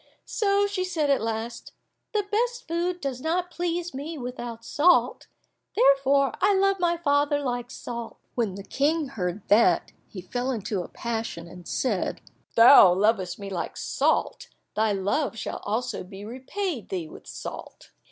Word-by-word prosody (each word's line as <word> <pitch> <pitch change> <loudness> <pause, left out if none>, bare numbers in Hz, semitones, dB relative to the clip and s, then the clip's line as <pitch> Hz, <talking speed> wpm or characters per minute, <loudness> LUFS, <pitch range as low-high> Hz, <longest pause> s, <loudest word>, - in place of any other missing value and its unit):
So 405 -1 +2
she 400 -2 -1
said 325 -6 0
at 275 - +2
last, 225 +1 -4 0.4
"The 420 -3 0
best 480 +3 0
food 345 +2 -1
does 265 -3 -3
not 355 +3 -1
please 350 0 -2
me 300 +5 -5
without 240 -2 -6
salt, 335 +8 +3 0.5
therefore 275 0 +4
I 400 +1 +4
love 390 0 +2
my 345 -1 +2
father 290 -2 +2
like 245 -3 -3
salt." 235 -2 -7 0.2
When 220 -6 -1
the 200 - -7
King 295 +5 0
heard 190 -5 -4
that, 205 -5 +4 0.2
he 195 - -9
fell 245 +8 -3
into 210 -5 -2
a - - -7
passion, 225 -7 -4
and 180 0 -12
said, 215 -8 -1 0.3
"If - - -34
thou 230 -5 +9
lovest 190 -3 +1
me 200 -1 -7
like 180 - -4
salt, - - 0 0.3
thy 220 0 +2
love 205 +7 0
shall - - -4
also 230 +2 -2
be 195 +2 -10
repaid 260 - -4
thee 180 -4 -3
with - - -13
salt." - - -8
255 Hz, 160 wpm, -26 LUFS, 215-335 Hz, 0.5 s, thou